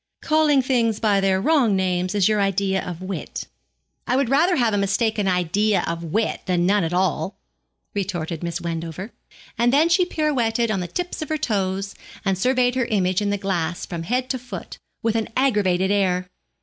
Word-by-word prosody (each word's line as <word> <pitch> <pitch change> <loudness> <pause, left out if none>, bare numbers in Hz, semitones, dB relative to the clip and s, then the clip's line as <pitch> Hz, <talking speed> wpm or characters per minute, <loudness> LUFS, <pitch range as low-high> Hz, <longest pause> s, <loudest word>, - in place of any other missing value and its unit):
'Calling 305 -3 +3
things 235 -4 +1
by 205 -3 +2
their 190 -1 +2
wrong 250 -3 +3
names 185 0 0
is 200 -3 +4
your 215 -1 +2
idea 195 -1 +1
of 180 0 -6
wit.' 190 0 -5 0.6
'I 250 - +2
would 270 -2 +1
rather 330 +7 +3
have 235 -6 +2
a - - +2
mistaken 205 +1 +1
idea 185 +2 +1
of 170 0 -3
wit 215 +7 -1
than 175 -1 +1
none 200 +1 +3
at 165 - -2
all,' 180 0 0 0.6
retorted 175 -5 -3
Miss 170 0 -3
Wendover, 170 +4 -5 0.5
and 240 +1 +4
then 300 +5 +4
she 350 +2 +4
pirouetted 245 -9 0
on 195 - 0
the 180 - -3
tips 355 - -4
of 310 - -4
her 310 - 0
toes, 195 -5 -1 0.3
and 195 -1 +2
surveyed 250 +5 +2
her 255 -1 0
image 190 -4 +1
in 205 - 0
the 205 - 0
glass 180 -3 -2
from 170 -2 -5
head 250 +9 -1
to 260 - -2
foot, 230 -8 -8 0.2
with 225 0 +1
an 225 -1 -1
aggravated 200 -8 +2
air. 185 -3 +1
200 Hz, 190 wpm, -22 LUFS, 185-245 Hz, 0.6 s, is